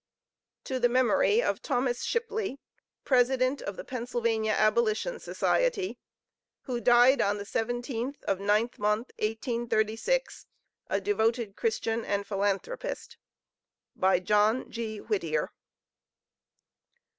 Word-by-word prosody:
To 260 -1 -3
the 245 0 +3
Memory 280 - +3
of - - -1
THOMAS 250 -3 -1
SHIPLEY, 440 - -2 0.5
President 255 +1 +2
of 200 - -5
the - - -6
Pennsylvania 230 -3 -1
Abolition 220 - +1
Society, 480 -7 0 0.6
Who 245 -3 -4
died 245 +3 +6
on 205 +1 +1
the 200 - -5
17th 240 +4 -3
of 190 - -1
Ninth 210 +4 +1
mo., 210 +3 +1
1836, 225 - -1 0.4
a - - 0
devoted 230 - 0
Christian 225 0 -1
and 200 0 -1
Philanthropist. 205 - -3 0.8
BY 190 -1 +3
JOHN 210 +5 +2
G. 225 -2 -4
WHITTIER. 165 -8 -1
235 Hz, 105 wpm, -28 LUFS, 215-260 Hz, 0.8 s, died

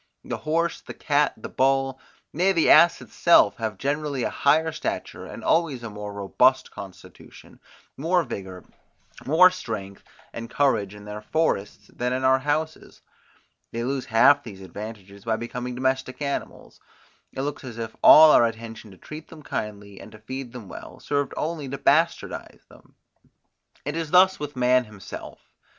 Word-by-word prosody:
The - - -4
horse, 165 +2 -1
the - - -10
cat, 145 -1 +1
the - - -8
bull, 135 0 +1 0.3
nay 185 +5 +2
the 165 -3 +3
ass 170 +3 +6
itself, 170 - +4
have 110 -4 -4
generally 140 +1 -2
a - - -1
higher 160 +3 +2
stature, 160 - -5
and - - -9
always 150 -8 +1
a 115 - -6
more 105 0 -7
robust 100 +6 +2
constitution, 95 -2 -13 0.4
more 170 +4 +1
vigour, 95 - -7 0.6
more 180 +6 +7
strength 100 - -7 0.3
and 115 0 -7
courage 105 -8 +1
in 105 0 -12
their 105 0 -7
forests 105 -7 -2
than 125 +1 -2
in 130 +1 -2
our 130 0 +4
houses; 155 +3 -3 0.7
they 115 0 -3
lose 135 +1 -2
half 140 +6 +5
these 100 -5 -10
advantages 100 +1 -9
by 115 -1 0
becoming 125 +2 -5
domestic 130 0 -1
animals; 140 -1 -5 0.5
it 130 - -5
looks 145 0 -4
as 120 -3 -8
if 115 -1 -6
all 155 0 +9
our 120 - +6
attention 115 -1 -8
to 95 - -15
treat 155 - -10
them 155 -2 -13
kindly, 100 -4 -6
and - - -13
to - - -11
feed 130 +3 -7
them 120 -5 -10
well, - - -10
served 145 -1 -1
only 155 -3 -3
to 140 - -4
bastardize 160 +5 0
them. - - -20 0.9
It 145 +2 -3
is 165 -2 -3
thus 185 +3 +5
with 145 -1 -6
man 125 0 +3
himself. 105 -3 -10
130 Hz, 165 wpm, -24 LUFS, 110-150 Hz, 0.9 s, all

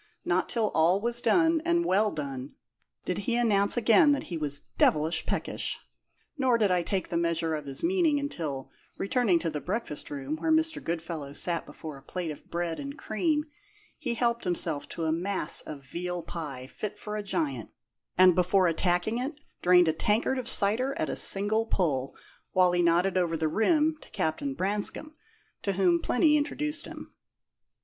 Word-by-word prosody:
Not 180 +1 +1
till 225 -3 0
all 170 +4 +3
was 235 +2 +1
done, 325 -2 +3
and 340 0 +1
well 210 - +3
done, 140 -5 -6 0.5
did 180 - -2
he 230 +4 -1
announce 210 -3 +2
again 240 +6 +5
that 280 - -2
he - - -1
was 145 -3 -2 0.2
devilish 155 +2 +2
peckish; - - -2 0.6
nor 255 -3 +3
did 210 -4 +2
I 180 -1 +2
take 190 +2 -2
the 170 - -1
measure 170 -1 0
of 150 -2 -4
his 135 - -3
meaning 335 -5 +2
until, 160 - -5 0.3
returning 200 -3 +2
to 165 -1 -2
the 150 -1 -4
breakfast 190 -6 -4
room 140 +2 -4
where 320 - -1
Mr. 320 0 +1
Goodfellow 165 -4 -4
sat 170 +2 -2
before 155 -3 -9
a - - -19
plate 170 +3 -5
of 150 - -12
bread 170 -1 -3
and 280 0 -6
cream, 300 +7 0 0.6
he 235 - -2
helped 235 0 0
himself 170 -5 -2
to 165 - -5
a 160 - +1
mass 180 0 0
of 145 -2 -8
veal 175 +5 -4
pie 145 -7 -6
fit 210 +10 -6
for 210 0 -6
a 210 - -2
giant, 280 +9 -2 0.5
and 185 -1 +7
before 180 +1 +3
attacking 175 +6 0
it 275 +5 -3 0.3
drained 180 -1 +5
a 160 - +2
tankard 220 +9 0
of 245 - -3
cider 235 +7 +4
at 155 - -1
a - - -3
single 215 +3 +4
pull, 140 -10 -1 0.4
while 185 -1 +4
he 175 0 +2
nodded 175 +2 +2
over 165 -2 0
the 160 - 0
rim 305 - +2
to - - -15
Captain 140 -3 -2
Branscome, 205 - -1 0.5
to 200 - -1
whom 180 -3 +3
Plinny 300 +4 +3
introduced 300 +1 -2
him. - - -10
185 Hz, 180 wpm, -28 LUFS, 165-235 Hz, 0.6 s, and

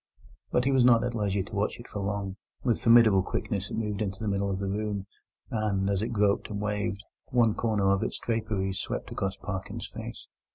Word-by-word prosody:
But 125 - +2
he 135 - +3
was 130 -2 +5
not 120 -2 +6
at 125 0 -1
leisure 100 -3 0
to 100 - -9
watch 100 +3 0
it 120 - -10
for 105 - -5
long. 100 -1 -2 0.3
With 120 -3 +1
formidable 115 -4 +7
quickness 100 +1 -2
it - - -4
moved 105 -2 -2
into 100 -2 -2
the 110 - -4
middle 100 0 0
of 95 - -1
the 100 - -3
room, 100 0 -2 0.5
and, 100 -3 +1
as 100 -1 0
it 110 - 0
groped 105 -4 +1
and 100 -1 -3
waved, 105 0 -2 0.2
one 120 -3 +3
corner 105 -4 +1
of 100 - +2
its - - -2
draperies 105 -4 -1
swept - - -4
across 95 0 -2
Parkins's 95 -1 -5
face. - - -7
105 Hz, 210 wpm, -28 LUFS, 100-110 Hz, 0.5 s, formidable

